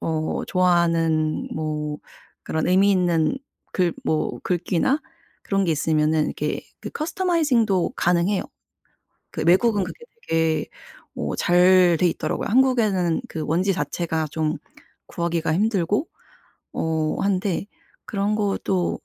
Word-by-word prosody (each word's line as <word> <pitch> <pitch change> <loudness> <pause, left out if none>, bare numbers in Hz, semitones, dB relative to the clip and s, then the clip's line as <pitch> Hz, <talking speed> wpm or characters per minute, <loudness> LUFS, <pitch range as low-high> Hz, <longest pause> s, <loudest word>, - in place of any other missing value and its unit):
어 155 -1 -2
좋아하는 165 -3 +1
뭐 150 -1 -3 0.5
그런 160 +2 -1
의미 195 +2 +4
있는 175 +3 +2 0.4
글 180 -3 +1
뭐 155 - -1
글귀나 180 - 0 0.4
그런 195 -1 0
게 165 - +1
있으면은 155 0 +1
이렇게 - - -3 0.2
그 - - -7
커스터마이징도 305 - +1
가능해요. 175 +3 +1 0.9
그 - - -3
외국은 200 +2 +4
그게 470 - -9 0.2
되게 160 -1 +1 0.5
어 - - -3
잘 180 -1 +5
돼 180 - +3
있더라고요. - - -3
한국에는 220 -7 +2
그 160 -7 -4
원지 180 +5 +1
자체가 165 -3 -2
좀 155 0 -1 0.5
구하기가 170 -2 -1
힘들고 205 - +1 0.6
어 160 -1 -1
한데 195 -1 0 0.4
그런 205 +1 -1
것도 195 -3 -1
175 Hz, 250 characters per minute, -23 LUFS, 160-200 Hz, 0.9 s, 잘